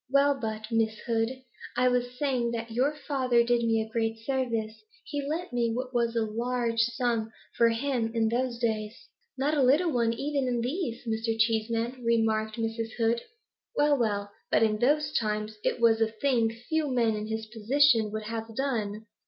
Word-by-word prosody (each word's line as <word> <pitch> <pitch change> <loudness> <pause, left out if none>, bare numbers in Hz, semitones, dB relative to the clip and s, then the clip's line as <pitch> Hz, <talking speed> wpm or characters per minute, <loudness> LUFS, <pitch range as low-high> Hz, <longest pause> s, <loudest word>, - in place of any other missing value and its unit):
Well 280 +1 +3
but, 220 -1 -4
Miss 220 -1 +1
Hood, 225 -2 +1 0.5
I 250 0 +4
was 250 0 0
saying 255 -4 0
that 230 0 -4
your 255 +6 +2
father 260 -5 +1
did 240 0 +2
me 225 -1 +2
a 220 0 -13
great 225 -1 0
service; 230 -3 -2 0.2
he 290 -1 -3
lent 315 +3 -4
me 235 -1 +1
what 255 +1 -4
was 235 -1 +1
a 230 - +2
large 235 +1 -1
sum 230 -2 0 0.2
for 235 0 +5
him 230 -1 -1
in 225 -1 +2
those 245 +1 -1
days 220 -1 -2 0.2
' - - -45
'Not 280 +3 +1
a 290 - +2
little 295 +7 +4
one 235 -3 +2
even 275 +2 -1
in 240 -1 0
these, 250 -1 -3
Mr. 225 0 -1
Cheeseman,' 230 +2 0
remarked 220 -2 +1
Mrs. 225 0 -3
Hood. 230 0 +2 0.5
'Well, 295 0 +4
well, 205 -5 -1 0.2
but - - +3
in 215 -1 +2
those 300 +4 +2
times 215 -1 -3
it - - 0
was 225 -1 +4
a 225 - +4
thing 230 +1 +1
few 295 +8 -2
men 235 -4 +2
in 210 0 -4
his 220 0 -3
position 225 +1 +3
would 215 +1 -4
have 225 0 -5
done. 220 -6 -2
235 Hz, 185 wpm, -28 LUFS, 225-255 Hz, 0.5 s, for